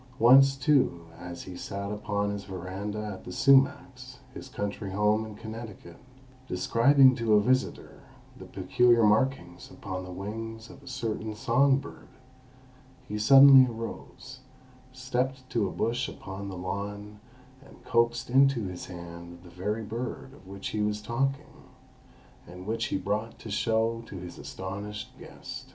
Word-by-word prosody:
Once, 135 Hz, +3 st, +7 dB
too, 130 Hz, -, +1 dB
as 90 Hz, -1 st, -8 dB
he 90 Hz, -, -9 dB
sat 100 Hz, +3 st, -5 dB
upon 105 Hz, -1 st, -2 dB
his 100 Hz, -1 st, -6 dB
veranda 95 Hz, +3 st, -5 dB
at 95 Hz, -, -11 dB
The -, -, -8 dB
Sumacs, 135 Hz, 0 st, +2 dB, 0.2 s
his 135 Hz, -, -9 dB
country 100 Hz, -3 st, -4 dB
home 105 Hz, +2 st, +1 dB
in 105 Hz, -, -10 dB
Connecticut, 110 Hz, -6 st, -9 dB, 0.5 s
describing 130 Hz, +8 st, +4 dB
to 115 Hz, -2 st, +2 dB
a -, -, +6 dB
visitor 130 Hz, +5 st, -1 dB, 0.3 s
the -, -, -11 dB
peculiar 120 Hz, -2 st, +2 dB
markings 105 Hz, -5 st, +1 dB
upon 95 Hz, -1 st, -6 dB
the 90 Hz, -, -9 dB
wings 110 Hz, +4 st, -7 dB
of 135 Hz, -, -15 dB
a 140 Hz, -, -17 dB
certain 110 Hz, -3 st, -4 dB
song 130 Hz, +5 st, +3 dB
bird, 140 Hz, +1 st, -10 dB, 1.0 s
he 105 Hz, -, -4 dB
suddenly 135 Hz, +2 st, +8 dB
arose, 115 Hz, +3 st, -8 dB, 0.5 s
stepped 130 Hz, 0 st, -3 dB
to 110 Hz, -4 st, +1 dB
a -, -, -5 dB
bush 120 Hz, +2 st, -1 dB
upon 95 Hz, +1 st, -8 dB
the 95 Hz, -, -7 dB
lawn, 100 Hz, +3 st, -5 dB, 0.4 s
and -, -, -18 dB
coaxed 120 Hz, 0 st, +1 dB
into 135 Hz, -2 st, +3 dB
his 90 Hz, -2 st, -6 dB
hand 85 Hz, -1 st, -10 dB
the 90 Hz, -, -14 dB
very 105 Hz, +6 st, -3 dB
bird 125 Hz, +4 st, -6 dB
of 95 Hz, -, -17 dB
which 100 Hz, 0 st, -6 dB
he 105 Hz, -, -2 dB
was 105 Hz, 0 st, 0 dB
talking, 135 Hz, +6 st, -3 dB, 0.8 s
and 90 Hz, +1 st, -10 dB
which 115 Hz, +2 st, -2 dB
he -, -, -1 dB
brought 105 Hz, +4 st, -3 dB
to 110 Hz, -, -9 dB
show 115 Hz, +2 st, 0 dB
to 95 Hz, -, -8 dB
his 90 Hz, -1 st, -9 dB
astonished 100 Hz, +2 st, -7 dB
guest. -, -, -10 dB
110 Hz, 150 wpm, -28 LUFS, 100-125 Hz, 1.0 s, suddenly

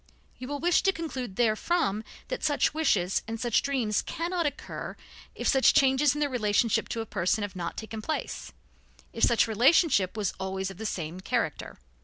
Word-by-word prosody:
You 255 Hz, -, -6 dB
will 290 Hz, +1 st, -3 dB
wish 345 Hz, +3 st, +3 dB
to 390 Hz, -, +3 dB
conclude 265 Hz, -, -5 dB
therefrom 220 Hz, -, +1 dB, 0.3 s
that -, -, -4 dB
such 295 Hz, -1 st, +2 dB
wishes 205 Hz, -, +1 dB
and 225 Hz, 0 st, -4 dB
such 240 Hz, -1 st, +2 dB
dreams 245 Hz, -7 st, 0 dB
cannot 340 Hz, 0 st, -2 dB
occur 285 Hz, -, -6 dB, 0.4 s
if -, -, -3 dB
such 265 Hz, -2 st, +4 dB
changes 270 Hz, +1 st, +4 dB
in 295 Hz, -, -3 dB
the 290 Hz, -, +3 dB
relationship 230 Hz, -3 st, +1 dB
to 230 Hz, -, -2 dB
a -, -, -5 dB
person 205 Hz, 0 st, 0 dB
have 205 Hz, -1 st, -5 dB
not 170 Hz, -2 st, -4 dB
taken 220 Hz, 0 st, -6 dB
place; 310 Hz, +8 st, -4 dB, 0.6 s
if 230 Hz, -, -3 dB
such 235 Hz, -1 st, +4 dB
relationship 225 Hz, -, +3 dB
was 205 Hz, -3 st, -1 dB
always 190 Hz, 0 st, -3 dB
of 190 Hz, -, -12 dB
the 220 Hz, +1 st, -3 dB
same 170 Hz, -2 st, -4 dB
character. 185 Hz, -, -2 dB
230 Hz, 180 wpm, -28 LUFS, 205-290 Hz, 0.6 s, such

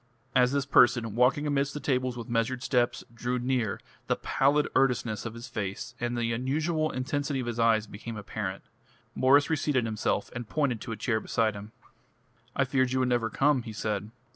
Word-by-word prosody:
As 125 Hz, 0 st, +5 dB
this 140 Hz, -1 st, 0 dB
person, 120 Hz, -4 st, +4 dB
walking 130 Hz, +6 st, +3 dB
amidst 140 Hz, -1 st, 0 dB
the -, -, -3 dB
tables 130 Hz, -3 st, 0 dB
with 120 Hz, -, -6 dB
measured 120 Hz, +2 st, -1 dB
steps, 120 Hz, -2 st, +1 dB
drew 120 Hz, +2 st, -2 dB
near, 125 Hz, -3 st, -1 dB, 0.3 s
the -, -, +2 dB
pallid 145 Hz, +2 st, +2 dB
earnestness 125 Hz, -5 st, +1 dB
of 115 Hz, -, -8 dB
his 120 Hz, +2 st, -8 dB
face 110 Hz, +1 st, -4 dB
and 120 Hz, 0 st, -2 dB
the 115 Hz, -1 st, 0 dB
unusual 155 Hz, +6 st, 0 dB
intensity 140 Hz, +1 st, -2 dB
of 125 Hz, -, -3 dB
his 120 Hz, -1 st, -4 dB
eyes 115 Hz, -2 st, +3 dB
became 110 Hz, +2 st, -8 dB
apparent. 100 Hz, -2 st, -5 dB, 0.5 s
Mwres 140 Hz, +2 st, +5 dB
reseated 145 Hz, -6 st, +1 dB
himself 110 Hz, 0 st, -1 dB
and 120 Hz, -2 st, -6 dB
pointed 140 Hz, -7 st, 0 dB
to -, -, -6 dB
a 110 Hz, -, -4 dB
chair 110 Hz, -3 st, 0 dB
beside 110 Hz, -1 st, 0 dB
him. 100 Hz, +1 st, -9 dB, 0.8 s
"I 135 Hz, -, +3 dB
feared 130 Hz, 0 st, +1 dB
you 130 Hz, -, +1 dB
would 130 Hz, -, +1 dB
never 120 Hz, -2 st, +1 dB
come," 140 Hz, +2 st, +2 dB
he 115 Hz, -2 st, -8 dB
said. 105 Hz, -1 st, -3 dB
125 Hz, 190 wpm, -28 LUFS, 115-135 Hz, 0.8 s, As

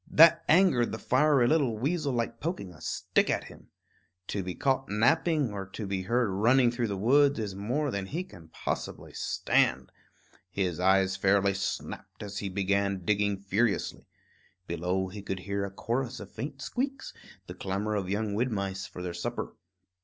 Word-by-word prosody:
That 165 Hz, +1 st, +7 dB
angered 160 Hz, -8 st, +4 dB
the 110 Hz, -, -3 dB
fiery 135 Hz, 0 st, +3 dB
little 135 Hz, -7 st, +2 dB
weasel 145 Hz, +4 st, 0 dB
like 115 Hz, -1 st, -2 dB
poking 125 Hz, -, -4 dB
a 75 Hz, -, -16 dB
stick -, -, 0 dB
at -, -, 0 dB
him. -, -, -14 dB, 0.6 s
To 100 Hz, -, -1 dB
be 90 Hz, -1 st, -5 dB
caught 135 Hz, -1 st, 0 dB
napping, 140 Hz, +4 st, +2 dB
or 100 Hz, -2 st, -5 dB
to 105 Hz, +2 st, -6 dB
be 95 Hz, -1 st, -2 dB
heard 115 Hz, +5 st, +1 dB
running 120 Hz, +5 st, +4 dB
through 120 Hz, -1 st, -1 dB
the 100 Hz, -2 st, -3 dB
woods, 140 Hz, +7 st, +4 dB
is 105 Hz, -3 st, -3 dB
more 125 Hz, +9 st, -1 dB
than 100 Hz, -3 st, -3 dB
he 170 Hz, -, -3 dB
can 85 Hz, -, -14 dB
possibly -, -, -5 dB
stand. -, -, +1 dB, 0.6 s
His 90 Hz, -2 st, -2 dB
eyes 95 Hz, +1 st, +3 dB
fairly 100 Hz, 0 st, +3 dB
snapped 100 Hz, +2 st, -5 dB
as 100 Hz, 0 st, -5 dB
he 100 Hz, -, -3 dB
began 100 Hz, -1 st, 0 dB
digging 100 Hz, 0 st, +1 dB
furiously. 100 Hz, +3 st, -1 dB, 0.6 s
Below, 90 Hz, +3 st, -1 dB
he 100 Hz, +2 st, -8 dB
could 95 Hz, -1 st, -4 dB
hear 100 Hz, +1 st, -2 dB
a -, -, -5 dB
chorus 120 Hz, +5 st, -3 dB
of 100 Hz, -1 st, -10 dB
faint 140 Hz, 0 st, -6 dB
squeaks, 270 Hz, +2 st, -3 dB, 0.3 s
the -, -, -8 dB
clamor 100 Hz, +3 st, -2 dB
of 100 Hz, -3 st, -2 dB
young 105 Hz, +1 st, -1 dB
wood 120 Hz, +4 st, 0 dB
mice 100 Hz, -1 st, -3 dB
for 90 Hz, -, -8 dB
their 90 Hz, -1 st, -4 dB
supper. 85 Hz, -, -4 dB
105 Hz, 175 wpm, -29 LUFS, 95-130 Hz, 0.6 s, That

